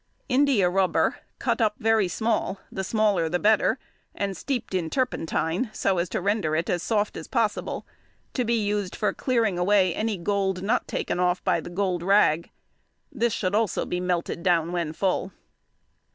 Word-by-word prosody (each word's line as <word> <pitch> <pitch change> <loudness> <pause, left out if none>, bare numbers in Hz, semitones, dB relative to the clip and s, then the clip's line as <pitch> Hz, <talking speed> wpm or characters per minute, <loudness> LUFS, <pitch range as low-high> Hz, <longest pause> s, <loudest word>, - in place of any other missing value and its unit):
India 260 -7 +3
rubber, 185 +1 +2 0.2
cut - - 0
up 215 -1 +2
very 220 -3 +2
small—the 200 -1 -2
smaller 200 -5 +1
the 180 - +1
better—and 205 -1 0
steeped 250 - -3
in 175 -3 -1
turpentine, 200 - -1
so 190 -4 +1
as 170 0 -1
to - - -2
render 195 -5 0
it 165 +2 0
as 175 - 0
soft 210 +1 0
as 160 - -7
possible, 230 -4 -1 0.5
to 250 - 0
be 235 0 +1
used 205 -3 -1
for 210 - 0
clearing 230 -8 0
away 185 -1 +3
any 215 +1 -1
gold 190 0 -1
not 230 +5 0
taken - - -2
off 180 0 +1
by - - +2
the - - -8
gold 180 -1 -1
rag. 175 -4 +3 0.6
This 235 0 0
should 185 -4 -1
also 220 -1 +1
be 180 - -2
melted 180 -1 -2
down 170 -2 +2
when 170 -3 -1
full. 185 +3 -1
195 Hz, 165 wpm, -25 LUFS, 180-215 Hz, 0.6 s, India